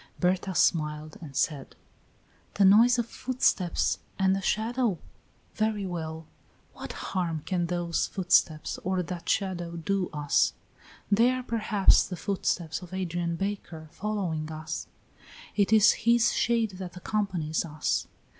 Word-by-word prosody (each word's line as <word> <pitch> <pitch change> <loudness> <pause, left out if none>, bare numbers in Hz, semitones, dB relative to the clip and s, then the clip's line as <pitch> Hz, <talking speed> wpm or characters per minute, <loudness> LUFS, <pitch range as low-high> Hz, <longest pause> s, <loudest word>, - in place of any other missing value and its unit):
Berta 185 +1 0
smiled 155 -2 +1
and 145 -5 -10
said: 140 -1 -1 0.8
"The 200 - +4
noise 230 +6 +6
of 235 - 0
footsteps 235 -8 0 0.2
and 190 0 +3
a 195 - -2
shadow? 225 0 0 0.6
Very 215 -2 0
well; 160 -3 -5 0.5
what - - -7 0.2
harm 165 -5 -1
can 175 -3 0
those 175 -1 -1
footsteps 175 -4 +1
or 185 0 -1
that 175 0 -6
shadow 175 -3 -1
do 185 +2 -1
us? 150 -2 +2 0.6
They 230 +4 +5
are 255 0 -1
perhaps 215 -4 +3
the 185 - -5
footsteps 170 -2 -2
of 180 0 -8
Adrian 175 -2 -2
Baker 175 -5 -5
following 180 -7 -3
us; 155 0 -5 0.7
it 205 0 +2
is 215 -2 +7
his 235 0 +3
shade 230 -3 +1
that 180 -1 -7
accompanies 180 -6 -1
us. 155 -2 -1
185 Hz, 130 wpm, -28 LUFS, 165-205 Hz, 0.8 s, is